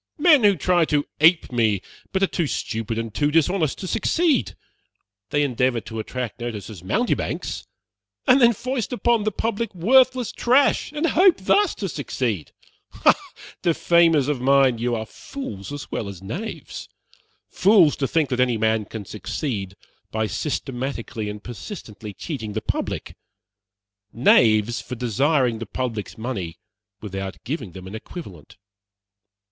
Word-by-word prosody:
Men 300 -5 +6
who 205 -1 +6
try 180 -1 +2
to 145 -1 +1
ape 160 0 +5
me, 110 -5 +2 0.3
but 195 0 0
are - - +7
too 175 -4 -1
stupid 115 -3 -3
and 115 -2 -4
too 145 +6 +1
dishonest 165 0 +2
to 190 - -6
succeed. 320 - +1 0.7
They 145 0 +2
endeavor 125 -2 +1
to 110 0 -7
attract 125 +2 -5
notice 115 -3 -5
as 95 -5 -11
mountebanks, 240 - -2 0.6
and 265 0 +5
then 235 -1 +7
foist 255 +3 -3
upon 235 -3 +1
the 215 - +1
public 225 0 -2
worthless 255 +6 +4
trash, 260 +4 +2
and 300 +2 -1
hope 360 +2 +5
thus 395 - +2
to 195 - -3
succeed. 125 - -3 0.5
Ah! - - +9 0.5
defamers 165 -3 +3
of 145 -4 -1
mine, 135 -2 +4
you 120 0 0
are 110 -1 -3
fools 110 - -8
as 145 -1 -7
well 100 - -3
as 95 -3 -9
knaves. 185 - -6 0.6
Fools, 190 -6 +5
to 135 - 0
think 160 -1 +1
that 125 - -1
any 125 -2 +2
man 110 0 +1
can 110 0 -7
succeed 105 - -4 0.3
by 110 0 -1
systematically 120 -4 -3
and 105 0 -7
persistently 115 - -8
cheating 110 - -6
the 110 - -2
public. - - -3 1.0
Knaves, 115 -1 +4
for 125 - -7
desiring 125 +1 +1
the 115 - -6
public's 115 -3 -4
money 100 -8 -4 0.4
without 95 -2 -5
giving 125 - -5
them 95 +1 -9
an 95 - -9
equivalent. 110 - -10
130 Hz, 145 wpm, -23 LUFS, -, 1.0 s, Ah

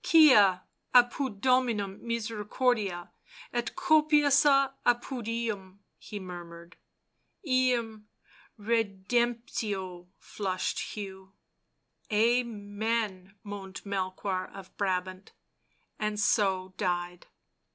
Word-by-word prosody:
" - - -42
Quia 210 - +6 0.3
apud 245 -3 +3
Dominum 235 -7 +1
misericordia, 220 -4 -1 0.4
et 240 -1 -2
copiosa 295 -5 +4
apud 245 -1 0
eum," 205 -4 -4 0.2
he 210 - -7
murmured. 175 -2 -10 0.4
" - - -48
Eum 240 -5 +1 0.5
redemptio," 210 -3 -1
finished 185 -3 -3 0.2
Hugh. 190 -2 -8 0.4
" - - -26
Amen," 215 -3 0
moaned 200 -2 -8
Melchoir 190 -1 -2
of 195 -1 -12
Brabant, 185 -1 -3 0.7
and 210 -1 -2
so 190 -3 +1
died. 175 -2 -2
210 Hz, 85 wpm, -29 LUFS, 190-240 Hz, 0.7 s, Quia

